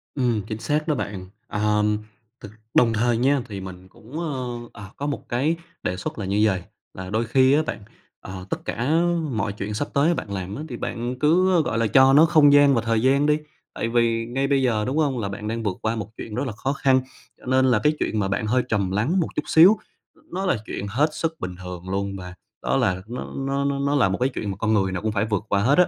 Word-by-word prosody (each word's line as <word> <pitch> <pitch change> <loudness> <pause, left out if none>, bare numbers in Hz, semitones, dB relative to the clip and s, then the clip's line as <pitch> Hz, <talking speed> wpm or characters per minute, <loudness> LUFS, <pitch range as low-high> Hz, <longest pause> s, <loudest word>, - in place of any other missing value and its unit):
Ừm, 120 -5 +1
chính 110 0 -5
xác 150 +5 -1
đó 150 - +1
bạn. 95 -6 -4 0.2
À, 105 - -4
ừm, 105 0 +2 0.4
thực 105 - -9 0.2
đồng 115 -2 +4
thời 115 +1 +1
nha 135 +3 +2
thì 100 -2 -6
mình 95 -1 -9
cũng, 125 - -10
ơ, 140 -7 -3 0.4
à, 100 - -11
có 145 - -3
một 145 - -5
cái 140 +7 +1 0.3
đề 90 - -2
xuất 95 - -5
là 100 - -3
như 100 +2 0
vầy, 95 -4 +1 0.3
là 95 0 -7
đôi 110 +3 0
khi 130 +3 +4
á 150 - +4
bạn, - - -4 0.4
ờ, 95 -1 -8
tất - - -4
cả 120 +3 -2 0.4
mọi 110 -2 -1
chuyện 105 +1 -5
sắp 145 +8 -2
tới 150 +4 +3
bạn 105 - -5
làm 95 +1 -4
á 150 - -5
thì 120 - -5
bạn 120 +2 -4
cứ, 180 +5 +4
ơ, 165 - +5
gọi 115 - -2
là, 115 -1 +2
cho 130 +4 +6
nó 150 +4 +7
không 155 -3 +5
gian 145 -1 +6
và 115 - +2
thời 115 -1 0
gian 135 +3 +3
đi, 150 0 +3 0.4
tại 115 - -2
vì 115 -1 +1
ngay 135 +4 -1
bây 140 -1 +2
giờ, 110 -4 +1
đúng 135 +4 -2
hông? 140 -6 +1
Là 100 - -2
bạn 105 +2 -6
đang 115 +1 -3
vượt 100 -4 -2
qua 110 +1 0
một 105 -1 -5
chuyện 105 - -7
rất 130 - -1
là - - -3
khó 130 +6 -2
khăn, 130 -2 +3 0.4
cho - - -17
nên 130 +1 +3
là 120 -4 +3
cái 150 - +4
chuyện 110 - -1
mà 95 - 0
bạn 100 +2 -1
hơi 125 +2 +2
trầm 100 -4 0
lắng 120 - +1
một 165 - +1
chút - - -1
xíu, 180 +7 +7 0.5
nó 190 +2 -2
là 180 - +2
chuyện 100 - -5
hết 140 +9 +2
sức 160 0 -2
bình 90 -1 -5
thường 90 0 -7
luôn 100 +1 -2
và 90 -1 -8 0.3
đó - - +1
là 95 0 +1
nó 120 +2 -6
nó 135 +1 -1
nó 140 0 0
nó 140 +1 +1
là 115 -9 +3
một 95 - -1
cái 130 - +2
chuyện 105 -6 -4
mà 95 - -6
con 110 +1 0
người 95 -2 +2
nào 95 - -3
cũng 110 0 -1
phải 105 0 0
vượt 105 -2 -1
qua 100 0 +2
hết 135 +7 +3
á. 180 - +7
115 Hz, 260 wpm, -23 LUFS, 105-140 Hz, 0.5 s, nó